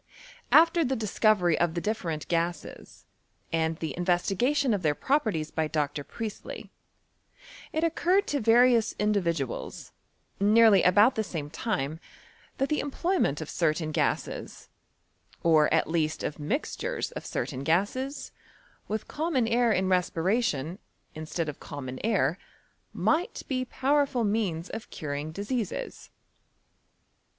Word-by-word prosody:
After 335 +1 +6
the 265 -2 0
discovery 210 -6 +2
of 175 -1 +1
the - - 0
different 170 -6 -3
gases, 170 0 -3 0.5
and 160 0 0
the 160 -5 -4
investigation 195 +10 +1
of 200 - -1
their 150 -3 +1
properties 215 - 0
by 160 -1 -1
Dr. 145 -1 -2
Priestley, 220 +6 -7 1.0
it 315 - -1
occurred 360 +4 +2
to 290 - 0
various 235 0 +4
individuals, 170 - -2 0.5
nearly 210 -1 +6
about 205 +7 +5
thf 220 -4 -2
same 150 -6 -5
time, 160 -6 -2 0.6
that 270 - 0
the 305 - +1
employment 290 - 0
of 155 - -6
certain 155 -1 0
gases, - - -2 0.7
or 155 -2 +4
at - - +2
least 160 -1 -1
of 150 - -4
mixtures 280 - -2
of - - -7
certain 130 - -4
gases, 205 - -1 0.6
with 215 +1 -3
common 295 -7 0
air 235 0 +3
in 190 -2 +1
respbation, 180 - 0 0.3
instead 155 +1 -4
of 150 - -6
common 130 -3 -7
air, 195 -7 +1 0.5
might 340 +4 0
be 255 -1 -1
powerful 275 -1 +1
means 200 -6 -1
of 225 - -7
curing 145 0 -5
diseases. 205 +4 -4
195 Hz, 125 wpm, -28 LUFS, 160-245 Hz, 1.0 s, After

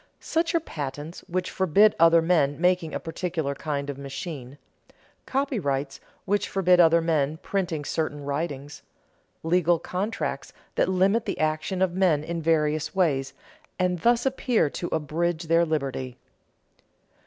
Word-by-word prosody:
Such 335 +1 -1
are - - +4
patents 150 - -6
which 180 0 -2
forbid 195 +3 +4
other 165 0 +6
men 155 -5 +2
making 180 -2 +2
a - - -1
particular 165 -3 -3
kind 140 0 -3
of 140 -1 -5
machine; 140 -1 -7 0.7
copyrights 145 - -1 0.3
which 205 +1 0
forbid 180 -2 +3
other 170 -1 +6
men 155 -2 0
printing 175 -7 -2
certain 145 -2 -2
writings; 145 -1 -4 0.6
legal 175 +1 +3
contracts 195 +7 -4 0.2
that - - +1
limit 195 +5 +2
the - - -3
action 155 +4 0
of 180 -2 0
men 175 -6 +2
in 170 +1 -4
various 155 0 +1
ways, 135 -7 +1 0.4
and 180 -1 0
thus 240 +5 +2
appear 250 - +1
to 175 - -4
abridge 160 +2 -1
their 165 +1 +3
liberty. 135 -5 -3
165 Hz, 135 wpm, -26 LUFS, 145-185 Hz, 0.7 s, other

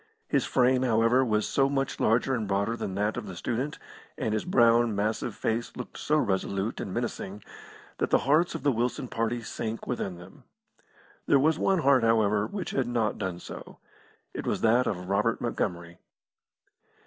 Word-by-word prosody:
His - - +1
frame, 130 0 +3
however, 120 +1 +3
was 110 -3 +1
so 135 0 +2
much 135 -1 -1
larger 120 +4 +2
and 115 -5 -1
broader 100 +3 0
than 95 -5 -4
that 105 +3 0
of 115 -4 -5
the 95 - -7
student, 125 - -3 0.4
and 110 - -1
his 110 - -1
brown, 120 - +4
massive 110 +2 -1
face 115 +1 -2
looked - - -7
so 150 - +1
resolute 100 -3 -1
and 95 - -4
menacing 105 -3 -4 0.6
that - - 0
the - - +5
hearts 155 +6 +3
of 155 - -5
the 145 - +3
Wilson 125 +2 -1
party 115 +1 -2
sank 110 0 -5
within 100 -7 -3
them. 90 +2 -14 0.8
There - - +5
was 155 +3 +2
one 190 -3 +2
heart, 135 -2 +5
however, 105 -2 +3
which 200 -3 -5
had 130 -3 0
not 115 -3 -1
done 95 -3 -3
so. - - -10 0.6
It - - -5
was - - -1
that 120 +3 +3
of 90 -3 -3
Robert 105 +4 +1
Montgomery. 85 -7 -3
115 Hz, 175 wpm, -28 LUFS, 105-130 Hz, 0.8 s, the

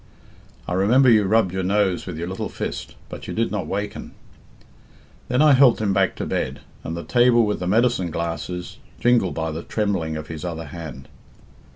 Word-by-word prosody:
I - - -2
remember 120 +8 +4
you 105 -3 +5
rubbed 100 -2 +2
your 95 - -1
nose 95 -1 0
with 90 -4 -5
your 85 +2 -4
little 95 +1 -4
fist, - - -5
but - - -9
you - - -5
did 115 -3 0
not 100 -6 -3
waken. 105 +4 -4 1.1
Then 125 +4 +2
I 155 - +6
helped 130 -2 +5
him 105 -3 0
back 95 -1 +2
to - - -4
bed, - - -3 0.2
and 80 +1 -4
the 85 - -5
table 120 -1 +4
with 105 - -1
the 90 - -3
medicine 110 -3 +2
glasses 85 +2 -4 0.2
jingled 120 -6 +2
by 80 -1 -2
the 80 +2 -5
trembling 90 -7 -2
of 75 - -6
his 80 -1 -7
other 80 -2 -4
hand. 75 -3 -9
95 Hz, 190 wpm, -22 LUFS, 85-110 Hz, 1.1 s, I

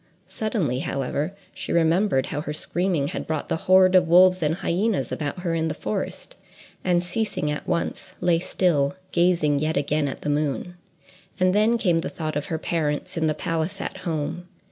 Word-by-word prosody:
Suddenly, 185 - -1
however, 140 +6 -2 0.2
she - - -6
remembered 170 -3 +3
how 145 - -3
her 150 - -4
screaming 170 -2 -1
had - - -5
brought 155 -2 -3
the - - +1
horde 185 0 +7
of 180 -2 +5
wolves 180 +2 +6
and 155 +1 +1
hyenas 190 -3 0
about 150 +4 -3
her 170 -2 -1
in 165 -1 0
the 155 - -3
forest, 105 -6 -4 0.5
and, 175 -1 +2
ceasing 180 -5 -2
at 150 - -5
once, 170 -1 -2
lay 175 -2 +2
still, 165 -5 +1 0.2
gazing 170 -5 +2
yet 155 +2 0
again 145 +1 +1
at 135 - -6
the - - -1
moon. 150 +4 -1 0.7
And 185 0 +3
then 215 +3 +3
came 175 -7 +2
the 165 - -3
thought 155 -2 -4
of 145 - -2
her 160 - -2
parents 155 -2 -2
in 160 -1 +1
the 155 - 0
palace 165 +2 -2
at - - -5
home. 175 0 -3
165 Hz, 185 wpm, -24 LUFS, 150-180 Hz, 0.7 s, horde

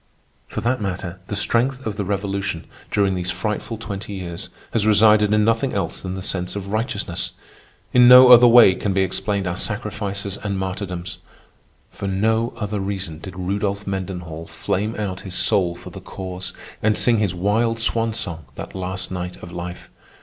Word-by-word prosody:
For - - -4
that 125 0 0
matter, 90 -2 -4
the 105 - -3
strength 125 +5 +1
of 110 -2 -2
the 100 - -2
Revolution, 100 -3 -2 0.3
during 100 -1 +2
these 90 0 -3
frightful 105 +5 -3
twenty 105 -1 -6
years, 85 -3 -6 0.2
has 110 -2 +3
resided 105 0 +5
in 105 0 +4
nothing 115 +4 +1
else 95 -5 -2
than 95 -1 -4
the 95 - -5
sense 90 0 -2
of 100 -1 -5
righteousness. 110 +4 -2 0.6
In 125 0 +7
no 125 0 +10
other 120 0 +10
way 115 -5 +8
can 100 +1 -2
be 95 - +2
explained 95 +2 -1
our 85 -1 -2
sacrifices 100 -1 -3
and 100 -1 -3
martyrdoms. 95 -2 -4 0.7
For 100 - -5
no 110 +4 +1
other 105 -2 -3
reason 95 -5 -4
did 95 +2 -9
Rudolph 100 +2 -2
Mendenhall 90 -4 -5
flame 105 +4 -2
out 95 -3 -3
his 95 -2 -6
soul 90 -2 +2
for 90 - -11
the - - -9
Cause 95 -1 -6 0.3
and 110 -1 +2
sing 115 -3 +3
his 100 -4 0
wild 115 +5 +1
swan 115 0 +1
song 80 -7 -4
that - - -7
last 95 0 -4
night 90 -1 -4
of 90 - -8
life. 90 0 -7
100 Hz, 175 wpm, -22 LUFS, 95-110 Hz, 0.7 s, no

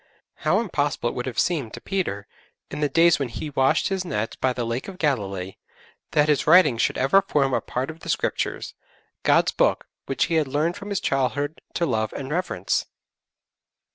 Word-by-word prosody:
How - - +2
impossible 145 - -1
it - - -6
would 125 +1 -4
have 130 - -5
seemed 150 -11 0
to - - -8
Peter, 170 - -3 0.5
in 150 - -5
the 150 -1 +1
days 170 0 +4
when 135 -3 -2
he 150 +6 -6
washed 135 +5 +2
his 190 -1 -1
nets 110 - -3
by 130 - +1
the 125 -1 -3
Lake 115 +3 -3
of 190 -2 -8
Galilee, 100 - -2 0.6
that 150 0 +4
his 150 -3 +1
writings 155 -8 +6
should - - +1
ever 135 +10 +4
form 140 -8 +1
a - - +1
part 130 +5 -3
of 160 - -14
the - - -9
Scriptures - - -1 0.5
God's - - +3
Book, - - +1 0.2
which 135 - +1
he 165 -1 0
had 150 - -3
learned 150 +6 0
from 205 - -8
his 200 -3 -1
childhood 135 +3 -1
to 170 - +1
love 110 -7 -1
and 135 0 -6
reverence! 165 - -1
145 Hz, 195 wpm, -24 LUFS, 125-165 Hz, 0.6 s, writings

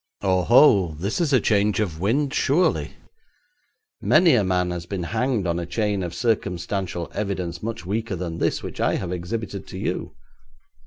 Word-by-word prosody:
'Oho, 95 - +4
this 100 - -2
is 160 -4 +1
a 130 - +5
change 105 -2 +2
of 85 -7 -2
wind, 135 - 0
surely. 160 +7 +1 1.1
Many 175 -3 +5
a 115 -5 +4
man 90 -1 0
has 85 -1 -5
been 95 -2 -3
hanged 115 +2 -1
on 85 0 0
a 85 - -5
chain 100 +2 -1
of 90 -1 -4
circumstantial 95 -5 -2
evidence 90 -4 -3
much 110 -6 -5
weaker 105 +2 -2
than 85 -2 -5
this - - 0
which - - -6
I - - +2
have 90 - -3
exhibited 100 +3 -4
to - - -8
you. - - -3
100 Hz, 165 wpm, -23 LUFS, 90-115 Hz, 1.1 s, a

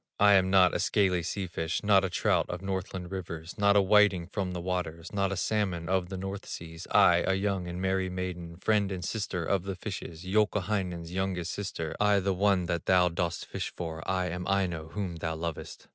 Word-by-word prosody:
"I 105 0 +7
am 95 -1 +4
not 95 -2 +5
a - - 0
scaly 95 -4 +2
sea 95 +3 -3
fish, 80 -1 -3
Not 100 -2 +5
a 95 - 0
trout - - +1
of 90 +2 -5
Northland 95 -2 -4
rivers, 85 -3 -6
Not 100 0 +4
a 100 - +6
whiting 100 -3 +4
from 95 0 -3
the 90 - -3
waters, 85 -2 -4
Not 100 -1 +1
a 100 - -2
salmon 95 -4 -1
of 95 -1 0
the 95 - -5
North 95 +1 -5
seas, 80 0 -8
I, - - +6
a 95 - +1
young 95 -2 -1
and 85 +1 -5
merry 95 0 0
maiden, 90 -2 -5
Friend 100 0 +1
and 90 -3 -4
sister 100 -6 -2
of 100 +1 +1
the 95 +1 -5
fishes, 90 -3 -7
Youkahainen's 95 -4 0
youngest 95 -2 -2
sister, 95 -6 -4
I, 105 -1 +4
the 95 0 0
one 95 -1 +2
that 85 -1 -3
thou 90 -1 +5
dost 85 -1 -2
fish - - -4
for, 80 -2 -4
I 95 -1 0
am 90 +1 -4
Aino 90 -5 0
whom 90 -1 -4
thou 80 0 -3
lovest. 80 -1 -6
95 Hz, 205 wpm, -29 LUFS, 85-100 Hz, -, I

